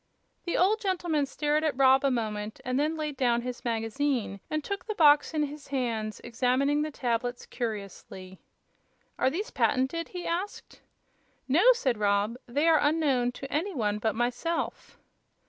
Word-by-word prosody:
The 345 - -1
old 420 +5 +3
gentleman 345 -7 0
stared 295 +2 0
at 305 -5 0
Rob 265 0 +5
a 275 - +3
moment 215 -3 -3
and 255 +2 0
then 310 +2 0
laid 300 -2 -3
down 240 -2 +2
his 250 -1 -6
magazine 230 -1 -1
and 310 -1 -2
took 400 +3 -4
the 430 - -3
box 295 -4 +5
in 310 -2 0
his 295 0 -6
hands, 230 -5 -2
examining 255 +5 +1
the 305 - -1
tablets 245 -3 -2
curiously. 200 -5 -6 0.8
"Are - - +3
these 370 +10 -4
patented?" 285 +6 0
he 360 -1 -7
asked. 360 +5 -4 0.7
"No," 285 +6 +3
said 260 - -1
Rob; 205 +2 +1
"they 290 +7 +1
are 320 -2 +6
unknown 290 -5 +2
to 270 +2 -8
any 345 +5 -1
one 210 -4 0
but 220 -1 0
myself." 245 +8 -2
270 Hz, 160 wpm, -28 LUFS, 235-310 Hz, 0.8 s, are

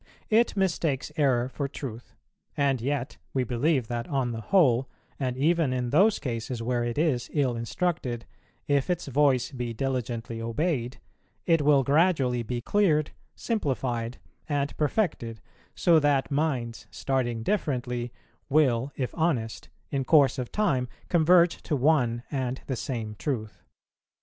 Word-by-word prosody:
It 225 -1 +3
mistakes 165 -7 0
error 130 -6 +2
for 140 +2 -3
truth; 125 -4 -8 0.4
and 135 -4 +2
yet 135 0 -2 0.2
we 130 - +2
believe 125 +2 +1
that 120 -1 -3
on 135 -4 0
the 115 -1 -5
whole, 135 - +3 0.3
and 130 -2 -2
even 160 0 +2
in 125 -1 -2
those 200 +8 +5
cases 120 -1 -4
where 120 +1 -1
it 120 0 -3
is 145 -6 +1
ill 135 -5 +1
instructed, 120 - -2 0.4
if 140 +1 +1
its 175 -1 -1
voice 135 -2 +2
be 120 -3 -4
diligently 120 -3 -3
obeyed, 125 +1 -1 0.5
it 165 -2 +3
will 145 -2 +4
gradually 140 -4 +2
be 120 +1 -3
cleared, 155 - +2 0.2
simplified, 130 - -2 0.3
and 145 -1 -1
perfected, 150 - -1 0.4
so 170 -2 +5
that 145 -2 +1
minds, 135 -6 -1
starting 120 -4 -1
differently 125 - -1 0.4
will, 135 -3 +2
if 130 -2 -3
honest, 140 -10 -1 0.2
in 135 -1 0
course 140 -2 +4
of 125 - -4
time 135 -13 +1 0.2
converge 170 +1 +4
to 150 - -1
one 125 -4 +2
and 130 -2 -2
the 130 - -2
same 115 -4 -4
truth. 110 -7 -3
135 Hz, 140 wpm, -27 LUFS, 120-150 Hz, 0.5 s, those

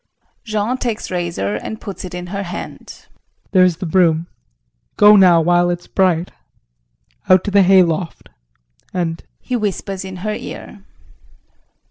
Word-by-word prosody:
JEAN 215 +3 -1
[Takes 230 -6 -3
razor 175 - -2
and 220 - -7
puts 200 - -8
it 180 -1 -7
in 180 0 -6
her 195 +3 -4
hand]. 180 -2 -8 0.5
There 185 -2 +5
is 180 -3 +2
the 185 - -5
broom, 165 -2 +2 0.7
go 210 0 +7
now 180 -4 +6
while 175 +1 +3
it's 175 0 -3
bright 180 -3 0 1.0
out 185 -1 +6
to 205 - -3
the 200 0 +5
hay 190 0 +6
loft 165 0 -3 0.7
and 165 -2 -2 0.2
[He 250 - -4
whispers 200 -3 -3
in 190 -1 -8
her 215 - -1
ear. 205 -1 -9
185 Hz, 145 wpm, -18 LUFS, 175-200 Hz, 1.0 s, go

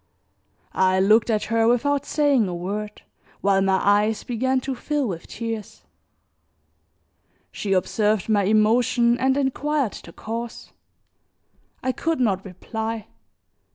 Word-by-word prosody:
I 185 0 +2
looked 210 +4 +4
at 215 -2 +1
her 225 0 +1
without 280 +4 +1
saying 285 -8 +2
a 180 - -4
word, 210 +4 -5 0.4
while 195 -1 +3
my 190 -1 +2
eyes 205 +2 +2
began 260 +2 0
to 265 +1 -3
fill 290 +1 -2
with 175 -4 -6
tears; 225 -3 -6 1.7
she 200 -2 -2
observed 205 +2 +1
my 205 -3 +2
emotion 235 +3 +3
and 265 +1 +2
inquired 280 -2 0
the 170 - -12
cause. 230 +5 -7 1.1
I 260 - +1
could 325 +3 -2
not 200 -6 +1
reply. 220 +3 -5
220 Hz, 120 wpm, -23 LUFS, 200-255 Hz, 1.7 s, looked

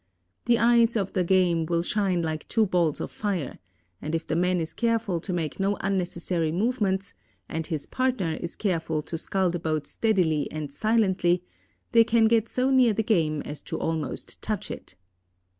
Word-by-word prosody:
The 235 0 +4
eyes 235 0 +4
of 195 -4 -1
the 185 - +1
game 175 -3 +2
will 170 0 +1
shine 190 -3 +1
like 155 -1 -3
two 225 -2 +2
balls 175 -6 +1
of - - -4
fire, 190 -10 -3 0.4
and 155 +2 -2
if 165 - -3
the 155 - -2
man 180 +1 +2
is 160 -1 -4
careful 230 -6 0
to 185 - -5
make 165 -2 -3
no 195 +1 +1
unnecessary 175 -4 -1
movements, 195 -1 0 0.3
and 160 -1 -3
his 155 -5 -2
partner 255 -11 0
is 170 - -5
careful 165 -6 -1
to 165 - -5
scull 190 0 0
the 175 - -3
boat 155 -2 -1
steadily 180 -9 +1
and 150 -2 -6
silently, 190 -3 +2 0.5
they 230 -1 +7
can 225 0 +3
get 225 0 +3
so 255 +1 +1
near 255 -4 +5
the 220 - 0
game 160 -8 +1
as 150 - -7
to - - -5
almost 160 -1 -3
touch - - -3
it. - - -9
180 Hz, 180 wpm, -26 LUFS, 165-220 Hz, 0.5 s, they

